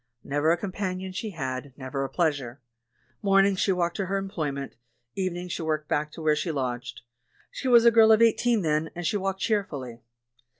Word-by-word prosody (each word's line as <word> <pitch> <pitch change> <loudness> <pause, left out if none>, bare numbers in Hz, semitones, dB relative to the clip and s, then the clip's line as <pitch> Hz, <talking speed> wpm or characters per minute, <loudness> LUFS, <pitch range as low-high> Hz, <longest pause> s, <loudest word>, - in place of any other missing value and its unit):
Never 145 +3 +1
a 170 - +3
companion 190 0 -4
she 215 +4 -4
had, 135 -5 -5
never 135 0 -4
a 135 - -3
pleasure. 145 -6 -1 0.6
INIornings 195 -1 +4
she 195 - +2
walked 175 -2 0
to 195 -2 -2
her 195 +2 0
employment; 150 -8 -4 0.4
even 185 -2 -2
ings 180 0 -6
she - - -3
walked 155 -1 -2
back 150 +1 -1
to 165 - -8
where 155 -1 +3
she 160 +3 -2
lodged. 125 -4 -4 0.5
She 265 - -5
was 235 -2 +6
a 235 - +8
girl 225 -1 +6
of 220 - +6
eighteen 230 -1 +3
then, 155 0 0
and 175 0 -5
she 205 - +1
walked 195 0 -3
cheer 210 -2 +2
fully. 130 - -8
175 Hz, 200 wpm, -26 LUFS, 145-195 Hz, 0.6 s, a